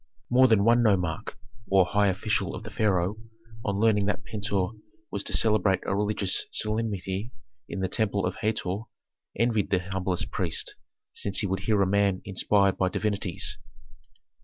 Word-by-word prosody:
More 130 Hz, +1 st, +6 dB
than 110 Hz, -4 st, +4 dB
one 120 Hz, +2 st, +5 dB
nomarch, 90 Hz, -8 st, +1 dB, 0.3 s
or 95 Hz, -2 st, +5 dB
high 100 Hz, +3 st, +2 dB
official 100 Hz, +2 st, 0 dB
of -, -, -7 dB
the -, -, -8 dB
pharaoh, 100 Hz, -2 st, +1 dB, 0.5 s
on 100 Hz, -1 st, -1 dB
learning 105 Hz, -2 st, +3 dB
that 105 Hz, +2 st, -1 dB
Pentuer 100 Hz, -3 st, -1 dB, 0.4 s
was 100 Hz, -, -2 dB
to -, -, +2 dB
celebrate 105 Hz, -4 st, +3 dB
a 100 Hz, -, 0 dB
religious 105 Hz, -2 st, 0 dB
solemnity 105 Hz, -1 st, -2 dB, 0.4 s
in 100 Hz, -, -4 dB
the 95 Hz, -, +1 dB
temple 100 Hz, 0 st, 0 dB
of 90 Hz, -, -2 dB
Hator, 105 Hz, -4 st, -1 dB, 0.6 s
envied 115 Hz, -1 st, +1 dB
the 95 Hz, -, +3 dB
humblest 90 Hz, 0 st, -2 dB
priest, -, -, -2 dB, 0.4 s
since 100 Hz, -1 st, -3 dB
he -, -, -1 dB
would 95 Hz, 0 st, -1 dB
hear 105 Hz, -2 st, +1 dB
a -, -, +2 dB
man 100 Hz, -1 st, +1 dB
inspired 100 Hz, 0 st, +2 dB
by 95 Hz, -, +2 dB
divinities. 100 Hz, -2 st, -2 dB
100 Hz, 160 wpm, -27 LUFS, 95-105 Hz, 0.6 s, More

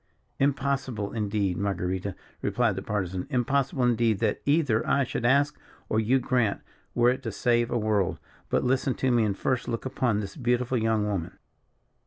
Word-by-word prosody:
"Impossible, 135 Hz, -6 st, 0 dB
indeed, 100 Hz, -4 st, -1 dB
Marguerita," 95 Hz, -1 st, -2 dB, 0.3 s
replied 120 Hz, -5 st, +1 dB
the 95 Hz, -, -4 dB
Partisan; 95 Hz, -3 st, -3 dB
"impossible, 135 Hz, +1 st, +1 dB
indeed, 115 Hz, -3 st, +2 dB
that -, -, 0 dB
either 145 Hz, -7 st, +3 dB
I 140 Hz, -, +3 dB
should 120 Hz, -1 st, -3 dB
ask, 145 Hz, +3 st, +3 dB, 0.3 s
or 110 Hz, -, +2 dB
you 115 Hz, +4 st, +3 dB
grant, 125 Hz, -4 st, 0 dB, 0.3 s
were 120 Hz, 0 st, +5 dB
it 130 Hz, +2 st, -3 dB
to 115 Hz, -4 st, -4 dB
save 120 Hz, +2 st, +1 dB
a -, -, 0 dB
world. 105 Hz, -4 st, +1 dB, 0.3 s
But, -, -, +1 dB
listen 130 Hz, +1 st, +1 dB
to 130 Hz, -, +1 dB
me, 120 Hz, -2 st, +3 dB
and 100 Hz, -2 st, -1 dB
first 130 Hz, -1 st, -1 dB
look 115 Hz, 0 st, -3 dB
upon 125 Hz, -5 st, 0 dB
this 100 Hz, -2 st, -5 dB
beautiful 125 Hz, -2 st, 0 dB
young 110 Hz, -1 st, +1 dB
woman." 95 Hz, -5 st, -3 dB
120 Hz, 170 wpm, -27 LUFS, 105-130 Hz, 0.3 s, were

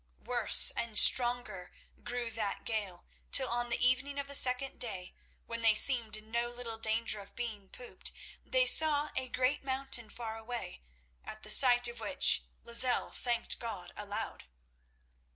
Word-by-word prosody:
Worse -, -, +5 dB
and 230 Hz, -2 st, -3 dB
stronger 240 Hz, -7 st, +4 dB, 0.3 s
grew 240 Hz, -1 st, -7 dB
that 215 Hz, -2 st, -6 dB
gale, 200 Hz, -6 st, -6 dB, 0.3 s
till 265 Hz, -2 st, +5 dB
on 240 Hz, 0 st, -4 dB
the 235 Hz, -, -2 dB
evening 270 Hz, +3 st, -3 dB
of 280 Hz, -, -5 dB
the 280 Hz, -, -9 dB
second 260 Hz, 0 st, +1 dB
day, 190 Hz, -7 st, -7 dB, 0.3 s
when 230 Hz, 0 st, -8 dB
they 225 Hz, -2 st, +3 dB
seemed 230 Hz, -3 st, +5 dB
in 215 Hz, +1 st, -17 dB
no 235 Hz, +1 st, -3 dB
little 240 Hz, -2 st, -10 dB
danger 220 Hz, -1 st, -2 dB
of 200 Hz, -, -15 dB
being 215 Hz, -5 st, -9 dB
pooped, 250 Hz, -, -7 dB, 0.3 s
they -, -, -1 dB
saw 300 Hz, -7 st, +5 dB
a 260 Hz, -1 st, -4 dB
great 255 Hz, +4 st, -3 dB
mountain 265 Hz, -4 st, -6 dB
far 225 Hz, -1 st, -9 dB
away, 230 Hz, -, -9 dB, 0.4 s
at 215 Hz, -, -12 dB
the 215 Hz, -, -4 dB
sight 245 Hz, -1 st, +6 dB
of 240 Hz, 0 st, -10 dB
which 280 Hz, -, +2 dB, 0.2 s
Lozelle 240 Hz, +1 st, +1 dB
thanked 235 Hz, -1 st, -4 dB
God 200 Hz, -7 st, -9 dB
aloud. 205 Hz, 0 st, -8 dB
235 Hz, 155 wpm, -29 LUFS, 220-255 Hz, 0.4 s, sight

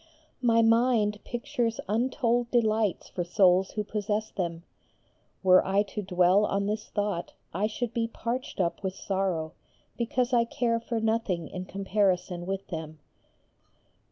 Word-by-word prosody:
My 230 Hz, -2 st, +4 dB
mind 225 Hz, -2 st, +3 dB
pictures 235 Hz, -1 st, -2 dB
untold 240 Hz, +2 st, +1 dB
delights 220 Hz, -4 st, +1 dB
for 175 Hz, -, -3 dB
souls 185 Hz, +1 st, +4 dB
who 210 Hz, -, -1 dB
possess 210 Hz, +1 st, -2 dB
them: 170 Hz, -3 st, -3 dB, 0.8 s
were 185 Hz, -1 st, +6 dB
I 195 Hz, +2 st, +2 dB
to 210 Hz, +1 st, -5 dB
dwell 185 Hz, +1 st, +3 dB
on 200 Hz, 0 st, 0 dB
this 210 Hz, +1 st, -2 dB
thought 205 Hz, -4 st, -2 dB, 0.2 s
I 200 Hz, +5 st, +1 dB
should 235 Hz, +1 st, -4 dB
be 230 Hz, -1 st, 0 dB
parched 235 Hz, +2 st, -4 dB
up 170 Hz, -2 st, 0 dB
with 190 Hz, -1 st, -3 dB
sorrow, 185 Hz, -6 st, -2 dB, 0.4 s
because 245 Hz, +1 st, 0 dB
I 235 Hz, -1 st, +5 dB
care 230 Hz, 0 st, 0 dB
for 230 Hz, 0 st, -3 dB
nothing 220 Hz, -7 st, 0 dB
in 185 Hz, 0 st, -6 dB
comparison 185 Hz, -3 st, 0 dB
with 195 Hz, 0 st, -3 dB
them. 160 Hz, -2 st, -6 dB
210 Hz, 140 wpm, -28 LUFS, 185-230 Hz, 0.8 s, were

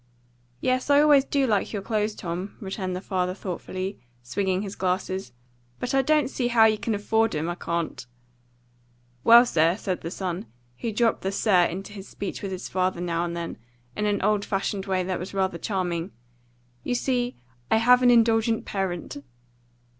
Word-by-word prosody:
"Yes, 255 Hz, +2 st, 0 dB
I 285 Hz, 0 st, +6 dB
always 295 Hz, -2 st, +6 dB
do 280 Hz, -1 st, +1 dB
like 210 Hz, -5 st, +1 dB
your 200 Hz, -2 st, -3 dB
clothes, 215 Hz, 0 st, -1 dB
Tom," 180 Hz, +2 st, -5 dB
returned 190 Hz, -3 st, -4 dB
the 180 Hz, -, -4 dB
father 185 Hz, -1 st, -1 dB
thoughtfully, 185 Hz, 0 st, -5 dB, 0.2 s
swinging 190 Hz, +9 st, -1 dB
his 200 Hz, -1 st, -6 dB
glasses, 185 Hz, -3 st, -2 dB, 0.5 s
"But 245 Hz, -, -3 dB
I 270 Hz, -, +4 dB
don't 300 Hz, +1 st, +2 dB
see 255 Hz, -2 st, -1 dB
how 235 Hz, -2 st, +5 dB
you 215 Hz, -1 st, +3 dB
can 225 Hz, 0 st, -1 dB
afford 220 Hz, 0 st, +1 dB
'em, 155 Hz, +2 st, -1 dB
I 175 Hz, -, -1 dB
can't." 170 Hz, -4 st, -3 dB, 1.2 s
"Well, 235 Hz, +1 st, +8 dB
sir," 165 Hz, -4 st, +2 dB
said 190 Hz, -4 st, -3 dB
the 165 Hz, -, -4 dB
son, 180 Hz, -5 st, -4 dB, 0.3 s
who 230 Hz, -, -2 dB
dropped 230 Hz, +1 st, +1 dB
the 190 Hz, -, -1 dB
"sir" 195 Hz, -3 st, +3 dB
into 195 Hz, +5 st, -5 dB
his 195 Hz, -1 st, -9 dB
speech 200 Hz, -, -6 dB
with 195 Hz, -, -4 dB
his 185 Hz, 0 st, -5 dB
father, 185 Hz, -1 st, 0 dB
now 170 Hz, -1 st, -1 dB
and 170 Hz, 0 st, -4 dB
then, 170 Hz, -7 st, -5 dB, 0.4 s
in 210 Hz, -, 0 dB
an 205 Hz, -1 st, 0 dB
old 210 Hz, -1 st, +2 dB
fashioned 195 Hz, 0 st, -2 dB
way 185 Hz, -1 st, +1 dB
that 185 Hz, 0 st, -2 dB
was 185 Hz, +3 st, -7 dB
rather 190 Hz, -3 st, 0 dB
charming, 180 Hz, -3 st, -2 dB, 0.7 s
"you 245 Hz, -, -1 dB
see, 245 Hz, -1 st, 0 dB, 0.3 s
I -, -, +4 dB
have 250 Hz, +2 st, +5 dB
an 250 Hz, -, +5 dB
indulgent 225 Hz, -1 st, +3 dB
parent." 185 Hz, -6 st, -3 dB
195 Hz, 180 wpm, -25 LUFS, 180-225 Hz, 1.2 s, Well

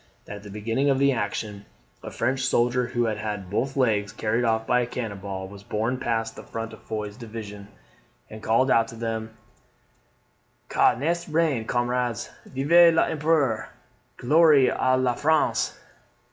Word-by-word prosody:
] -, -, -37 dB
that 105 Hz, -, -7 dB
at -, -, -12 dB
the 105 Hz, -, -11 dB
beginning 115 Hz, +7 st, -1 dB
of 135 Hz, -, +3 dB
the 140 Hz, +1 st, +3 dB
action, 105 Hz, -3 st, -3 dB, 0.4 s
a -, -, -7 dB
French 130 Hz, +3 st, -1 dB
soldier 125 Hz, 0 st, +1 dB
who 120 Hz, -1 st, 0 dB
had 110 Hz, -2 st, -1 dB
had 105 Hz, -3 st, -5 dB
both 135 Hz, +6 st, -1 dB
legs 105 Hz, -5 st, +1 dB
carried 110 Hz, +2 st, -1 dB
off 110 Hz, -1 st, +1 dB
by 125 Hz, -, +2 dB
a 120 Hz, -, -1 dB
cannon 115 Hz, -5 st, -5 dB
ball, 95 Hz, -1 st, -6 dB
was 100 Hz, +1 st, -12 dB
borne 115 Hz, +4 st, -2 dB
past 115 Hz, -2 st, -2 dB
the -, -, -9 dB
front 115 Hz, 0 st, -6 dB
of -, -, -13 dB
Foy's 105 Hz, -2 st, -5 dB
division, 110 Hz, -4 st, -8 dB, 0.6 s
and 110 Hz, 0 st, -10 dB
called 115 Hz, +5 st, +2 dB
out 115 Hz, 0 st, +4 dB
to 115 Hz, -, -10 dB
them, 110 Hz, -1 st, -4 dB, 1.4 s
"Ca -, -, +4 dB
n'est 170 Hz, +7 st, -2 dB
rien, 155 Hz, -7 st, +1 dB
camarades; 120 Hz, -2 st, -1 dB, 0.2 s
Vive 165 Hz, +6 st, +5 dB
l'Empereur! 150 Hz, -9 st, +1 dB, 0.5 s
Gloire 150 Hz, 0 st, +4 dB
a 130 Hz, 0 st, +2 dB
la 130 Hz, -1 st, +1 dB
France!" 155 Hz, +5 st, +1 dB
115 Hz, 165 wpm, -25 LUFS, 110-130 Hz, 1.4 s, Vive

